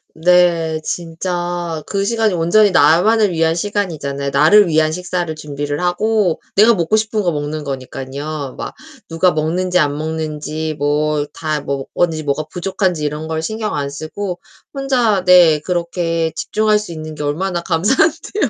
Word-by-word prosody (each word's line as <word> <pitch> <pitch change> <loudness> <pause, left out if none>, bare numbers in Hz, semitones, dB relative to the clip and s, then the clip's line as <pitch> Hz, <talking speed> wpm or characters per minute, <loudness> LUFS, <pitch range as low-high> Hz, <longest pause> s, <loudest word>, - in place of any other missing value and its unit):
네 170 -1 +3
진짜 175 -1 -3
그 195 -1 -2
시간이 220 -1 +1
온전히 180 +5 +3
나만을 185 +7 +4
위한 165 -1 +1
시간이잖아요. 165 -8 -3
나를 195 +8 +5
위한 155 -1 +2
식사를 175 -1 -3
준비를 145 0 -4
하고 185 0 +1
내가 220 +4 +6
먹고 175 +1 +1
싶은 215 0 0
거 180 -3 0
먹는 150 0 -4
거니깐요. 140 +1 -6
막 - - -6 0.4
누가 175 +2 +3
먹는지 175 +4 0
안 145 -3 +1
먹는지 155 0 -4
뭐 150 +1 0
다 155 -2 -2
뭐 140 -1 -3
어디지 160 -3 0
뭐가 145 +1 -1
부족한지 180 -2 -1
이런 150 +2 -4
걸 160 0 -2
신경 220 +3 -3
안 140 -1 -2
쓰고 175 +6 -5 0.3
혼자 250 -8 +1
네 175 -4 +6
그렇게 170 -1 -1
집중할 215 +3 +1
수 210 -4 -7
있는 155 -1 -7
게 - - -7
얼마나 170 +5 -2
감사한데요. 265 - +1
165 Hz, 315 characters per minute, -17 LUFS, 155-190 Hz, 0.4 s, 내가